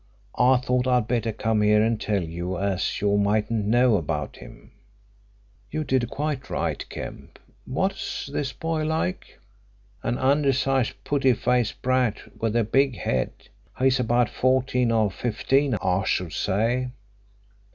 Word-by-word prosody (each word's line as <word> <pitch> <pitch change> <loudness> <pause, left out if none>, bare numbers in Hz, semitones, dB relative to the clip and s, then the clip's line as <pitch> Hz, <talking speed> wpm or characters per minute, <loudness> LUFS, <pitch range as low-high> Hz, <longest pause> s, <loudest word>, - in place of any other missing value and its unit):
I 125 +2 +6
thought 125 0 0
I'd 125 -3 +2
better 115 -2 0
come 110 0 0
here 105 0 +4
and 115 -1 0
tell 100 -3 0
you, 85 +3 -4
as 95 -1 -1
you 100 0 +2
mightn't 105 +1 +1
know 120 0 +4
about 75 -4 -3
him." - - -14 1.0
"You 155 - -2
did 130 -4 0
quite 145 -1 -3
right, - - -2
Kemp. - - -8 0.3
What's 190 +10 -2
this 140 -1 -3
boy 160 0 -2
like?" 155 - -2 0.6
"An 120 - -1
undersized 135 -2 +2
putty 135 -3 +2
faced 120 0 0
brat 130 -3 0
with 115 0 0
a 120 - +3
big 135 +2 +2
head. 65 -2 0 0.5
He's 130 0 +3
about 120 -1 +2
fourteen 130 -1 +1
or 110 -3 +2
fifteen, 130 +6 0
I 90 +1 +1
should 90 -4 -1
say." 115 +6 0
120 Hz, 140 wpm, -25 LUFS, 105-130 Hz, 1.0 s, I